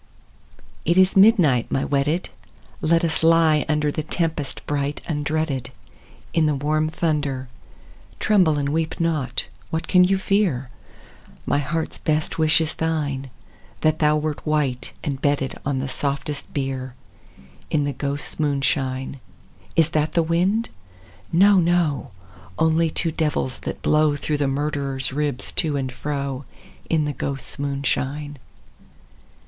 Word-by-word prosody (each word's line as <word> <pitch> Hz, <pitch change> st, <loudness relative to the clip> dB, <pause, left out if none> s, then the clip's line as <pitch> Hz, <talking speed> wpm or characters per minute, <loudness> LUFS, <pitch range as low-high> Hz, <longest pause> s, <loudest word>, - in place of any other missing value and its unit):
It 170 Hz, +2 st, +2 dB
is 185 Hz, 0 st, +5 dB
midnight, 185 Hz, -, +5 dB
my 135 Hz, -, +1 dB
wedded; 145 Hz, +5 st, 0 dB, 0.5 s
Let 165 Hz, +2 st, +3 dB
us 165 Hz, -, 0 dB
lie 160 Hz, -2 st, +4 dB
under 150 Hz, -1 st, +1 dB
The 155 Hz, -, -2 dB
tempest 155 Hz, -4 st, -2 dB
bright 145 Hz, 0 st, -1 dB
undreaded. 150 Hz, -3 st, -1 dB, 0.6 s
In 160 Hz, -2 st, +3 dB
the 150 Hz, -, +1 dB
warm 155 Hz, +3 st, 0 dB
thunder: 145 Hz, -6 st, -1 dB, 0.7 s
(Tremble 180 Hz, -8 st, +3 dB
and 140 Hz, -1 st, 0 dB
weep 160 Hz, +2 st, -1 dB
not 160 Hz, -6 st, 0 dB
I -, -, -23 dB, 0.2 s
What 160 Hz, 0 st, -3 dB
can 180 Hz, -1 st, +6 dB
you 190 Hz, +2 st, +3 dB
fear?) 185 Hz, -11 st, 0 dB, 0.7 s
My 145 Hz, -, +2 dB
heart's 160 Hz, +3 st, -3 dB
best 155 Hz, +1 st, -1 dB
wish 155 Hz, 0 st, +4 dB
is 160 Hz, -1 st, -1 dB
thine, 145 Hz, -5 st, -2 dB, 0.3 s
— -, -, -28 dB
That 155 Hz, 0 st, +2 dB
thou 150 Hz, 0 st, +4 dB
wert 150 Hz, -1 st, -3 dB
white, 140 Hz, -5 st, 0 dB
and 140 Hz, -3 st, -3 dB
bedded 145 Hz, -2 st, 0 dB
On 140 Hz, -2 st, 0 dB
the 135 Hz, +1 st, -2 dB
softest 140 Hz, +2 st, -3 dB
bier. 130 Hz, -2 st, -3 dB, 0.7 s
In 150 Hz, -2 st, +1 dB
the 145 Hz, 0 st, -1 dB
ghosts* 140 Hz, +3 st, -4 dB
moonshine. 135 Hz, -2 st, 0 dB, 0.6 s
Is 165 Hz, -1 st, +4 dB
that 155 Hz, -1 st, 0 dB
the 170 Hz, -, +3 dB
wind? 185 Hz, +8 st, +1 dB, 0.6 s
No, 195 Hz, +3 st, +6 dB
no; 170 Hz, -4 st, +1 dB, 0.5 s
Only 160 Hz, +1 st, +3 dB
two 165 Hz, +1 st, -1 dB
devils, 150 Hz, -4 st, -1 dB
that -, -, -6 dB
blow 150 Hz, -1 st, +3 dB
Through 150 Hz, +1 st, -2 dB
the 145 Hz, -1 st, +1 dB
murderer's 135 Hz, -1 st, -1 dB
ribs 145 Hz, -3 st, -2 dB
to 155 Hz, -4 st, -1 dB
and 130 Hz, -2 st, -2 dB
fro. 140 Hz, -1 st, -4 dB, 0.4 s
In 155 Hz, -2 st, +2 dB
the 145 Hz, -, -2 dB
ghosts' 135 Hz, 0 st, -5 dB
moonshine. 140 Hz, +1 st, -2 dB
150 Hz, 140 wpm, -23 LUFS, 140-160 Hz, 0.7 s, can